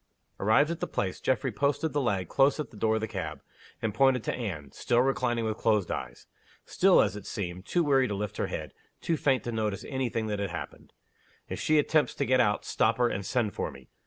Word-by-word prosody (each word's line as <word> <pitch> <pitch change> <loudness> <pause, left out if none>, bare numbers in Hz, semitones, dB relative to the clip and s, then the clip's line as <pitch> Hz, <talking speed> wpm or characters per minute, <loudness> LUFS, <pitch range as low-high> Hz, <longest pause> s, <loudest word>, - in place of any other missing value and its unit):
Arrived 125 +10 +4
at 170 - -4
the - - -2
place, 95 -2 -3
Geoffrey 130 0 0
posted 145 +7 0
the 145 - +1
lad 100 -8 0
close 140 - +3
at 150 - -4
the - - -15
door 110 +1 +1
of 110 - -1
the 110 - -2
cab, 80 -9 -5 0.4
and 110 -2 0
pointed 130 +1 +3
to - - -1
Anne, 80 - -5
still 120 - +1
reclining 125 -3 0
with 110 0 -2
closed 105 -5 +2
eyes; 60 -1 -5 0.4
still, 190 0 +5
as 105 -1 -2
it 105 - -8
seemed, 90 -3 -5
too 175 - +2
weary 135 -3 +3
to 105 - -3
lift 105 0 -4
her - - -1
head, - - -5 0.3
too 165 - 0
faint 135 -4 +1
to 120 - -3
notice 105 -3 -2
any 130 -2 -1
thing 115 -1 -2
that 105 -1 -2
happened. 90 -4 -6 0.6
"If - - -4
she 155 - +2
attempts 150 +1 +2
to 140 - -1
get 130 0 +3
out, 105 -4 +2
stop 115 +1 +1
her, 120 -1 +3
and 100 - -3
send 110 0 0
for - - -2
me." - - -14
115 Hz, 230 wpm, -28 LUFS, 100-135 Hz, 0.6 s, still